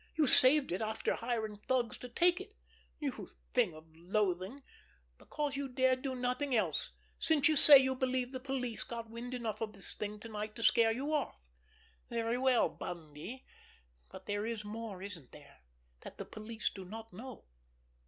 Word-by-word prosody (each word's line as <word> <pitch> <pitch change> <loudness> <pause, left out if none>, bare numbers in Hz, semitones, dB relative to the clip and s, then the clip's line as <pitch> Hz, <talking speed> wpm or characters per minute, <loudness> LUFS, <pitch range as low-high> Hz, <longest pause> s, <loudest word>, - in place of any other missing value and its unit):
You 310 - +3
saved 270 - +5
it, 180 - -1
after 220 0 -1
hiring 225 -3 -2
thugs 240 +2 0
to 250 - -8
take 350 +8 +4
it, 410 +2 -12 0.4
you 280 -4 -4 0.2
thing 225 -10 +2
of 155 0 -12
loathing, 190 - -1 0.6
because 295 -2 -3
you 280 0 -2
dared 260 0 +2
do 265 -1 -3
nothing 250 +2 -1
else, 180 -9 0 0.3
since 300 -3 +5
you 315 - +3
say 285 0 +10
you 265 0 +2
believe 255 -1 -1
the 260 - -4
police 255 -3 -3
got 230 -1 -7
wind 245 +2 -5
enough 230 -3 -4
of 215 -1 -3
this 195 -2 -1
thing 210 0 -5
tonight 215 -1 -6
to 230 - -5
scare 225 0 +5
you 275 +7 -2
off. 295 -3 0 0.7
Very 235 +1 -1
well, 260 -2 +4
Bundy—but 155 - -10
there 205 +1 -2
is 225 -2 -4
more, 210 -3 -6
isn't 180 -10 -9
there, - - -15 0.4
that - - -10
the - - -5
police 220 +1 -4
do 190 - -8
not 220 +3 -9
know? 250 +4 -9
230 Hz, 170 wpm, -34 LUFS, 210-260 Hz, 0.7 s, say